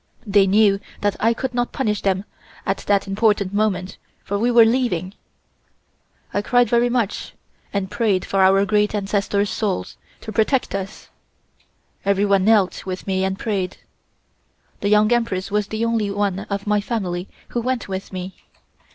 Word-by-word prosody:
They 200 Hz, -2 st, +4 dB
knew 200 Hz, 0 st, +4 dB, 0.2 s
that 205 Hz, -1 st, +1 dB
I 225 Hz, -, +3 dB
could 260 Hz, +1 st, -3 dB
not 245 Hz, 0 st, -1 dB
punish 210 Hz, -6 st, -1 dB
them 195 Hz, 0 st, 0 dB, 0.4 s
at 195 Hz, -, 0 dB
that 200 Hz, -1 st, +3 dB
important 200 Hz, -1 st, +1 dB
moment, 195 Hz, -3 st, -1 dB, 0.2 s
for 200 Hz, 0 st, -2 dB
we 235 Hz, +3 st, +2 dB
were 235 Hz, -2 st, +7 dB
leaving. 225 Hz, -7 st, 0 dB, 1.2 s
I 200 Hz, -, +1 dB
cried 245 Hz, +3 st, +3 dB
very 240 Hz, 0 st, +3 dB
much 235 Hz, -4 st, -2 dB, 0.4 s
and 200 Hz, -1 st, -2 dB
prayed 205 Hz, -4 st, +1 dB
for 195 Hz, -, +1 dB
our 195 Hz, +1 st, +5 dB
Great 210 Hz, +1 st, +1 dB
Ancestors' 200 Hz, 0 st, 0 dB
Souls 205 Hz, -4 st, -2 dB, 0.2 s
to 220 Hz, -, -7 dB
protect 240 Hz, +4 st, +1 dB
us. 195 Hz, +1 st, -6 dB, 0.9 s
Everyone 200 Hz, -1 st, +2 dB
knelt 210 Hz, -4 st, +3 dB
with 185 Hz, -1 st, -5 dB
me 190 Hz, -1 st, 0 dB
and 190 Hz, 0 st, -1 dB
prayed. 195 Hz, -5 st, -2 dB, 1.0 s
The 200 Hz, -, -1 dB
Young 210 Hz, +1 st, +4 dB
Empress 200 Hz, -5 st, -1 dB
was 210 Hz, -1 st, 0 dB
the 220 Hz, +2 st, -2 dB
only 225 Hz, -3 st, 0 dB
one 200 Hz, -1 st, -1 dB
of 200 Hz, 0 st, -3 dB
my 210 Hz, 0 st, +2 dB
family 190 Hz, -5 st, -3 dB, 0.2 s
who 240 Hz, -, -2 dB
went 255 Hz, 0 st, -2 dB
with 190 Hz, -1 st, -5 dB
me. 185 Hz, 0 st, -6 dB
205 Hz, 160 wpm, -21 LUFS, 195-220 Hz, 1.2 s, were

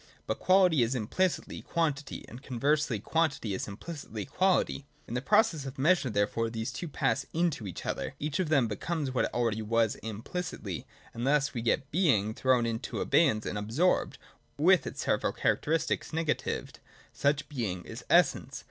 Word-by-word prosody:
But -, -, -2 dB
quality 185 Hz, -6 st, +5 dB
is 120 Hz, +3 st, +1 dB
implicitly 160 Hz, -, -1 dB
quantity, 150 Hz, -4 st, -2 dB
and 120 Hz, -, -10 dB
conversely 140 Hz, -2 st, 0 dB
quantity 145 Hz, -5 st, 0 dB
is 95 Hz, -, -3 dB
implicitly 110 Hz, -, -7 dB
quality. 185 Hz, -, +1 dB, 0.2 s
In -, -, -6 dB
the 125 Hz, -, -1 dB
process 170 Hz, -2 st, +3 dB
of 135 Hz, -, -8 dB
measure, 155 Hz, 0 st, +3 dB
therefore, 105 Hz, +2 st, 0 dB
these 110 Hz, 0 st, -3 dB
two 175 Hz, -, -5 dB
pass 135 Hz, -2 st, 0 dB
into 160 Hz, -, 0 dB
each 90 Hz, -, -7 dB
other: -, -, -3 dB
each 150 Hz, +1 st, -2 dB
of 180 Hz, -5 st, 0 dB
them 135 Hz, -6 st, +4 dB
becomes 140 Hz, -, -2 dB
what 130 Hz, -, +1 dB
it -, -, -4 dB
already 115 Hz, -3 st, 0 dB
was 115 Hz, 0 st, +2 dB
implicitly: 110 Hz, -, -5 dB, 0.3 s
and 120 Hz, +3 st, -3 dB
thus 145 Hz, 0 st, +2 dB
we 120 Hz, -, -3 dB
get 130 Hz, +4 st, 0 dB
Being 125 Hz, -, +2 dB
thrown 125 Hz, 0 st, +2 dB
into 115 Hz, +2 st, -3 dB
abeyance 135 Hz, -10 st, +3 dB
and 105 Hz, -, -2 dB
absorbed, 125 Hz, -, +1 dB, 0.4 s
with 180 Hz, +5 st, +4 dB
its -, -, -5 dB
several -, -, +1 dB
characteristics 160 Hz, +1 st, 0 dB
negatived. 160 Hz, -1 st, -2 dB, 0.3 s
Such 145 Hz, 0 st, +1 dB
Being 105 Hz, -, -3 dB
is -, -, -8 dB
Essence. -, -, +3 dB
135 Hz, 165 wpm, -30 LUFS, 115-160 Hz, 0.4 s, quality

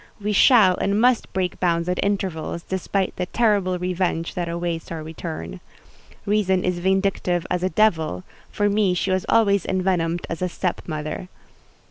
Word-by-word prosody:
We 210 Hz, +1 st, -1 dB
shall 205 Hz, -4 st, +6 dB
and 200 Hz, +1 st, 0 dB
must 245 Hz, 0 st, +2 dB
break 185 Hz, -2 st, -2 dB
bounds 170 Hz, -1 st, +1 dB
at 180 Hz, 0 st, 0 dB
intervals, 185 Hz, -4 st, -2 dB
despite 190 Hz, +1 st, -2 dB
the 180 Hz, -, -2 dB
terrible 200 Hz, -5 st, +1 dB
revenge 180 Hz, -2 st, -1 dB
that 175 Hz, -1 st, -3 dB
awaits 170 Hz, -1 st, -3 dB
our 160 Hz, -2 st, -5 dB
return. 155 Hz, -, -6 dB, 0.7 s
Reason 195 Hz, -3 st, +1 dB
is 180 Hz, -1 st, -1 dB
vindictive 190 Hz, -2 st, 0 dB
as 180 Hz, -1 st, 0 dB
a 185 Hz, -, +1 dB
devil: 160 Hz, -, +1 dB, 0.3 s
for 205 Hz, -, 0 dB
me 200 Hz, -3 st, +2 dB
she 190 Hz, +2 st, -1 dB
was 185 Hz, 0 st, -1 dB
always 200 Hz, -4 st, +3 dB
envenomed 180 Hz, -3 st, 0 dB
as 165 Hz, -, -5 dB
a 180 Hz, -, 0 dB
step 180 Hz, 0 st, -2 dB
mother. 155 Hz, +2 st, -5 dB
180 Hz, 160 wpm, -23 LUFS, 170-200 Hz, 0.7 s, shall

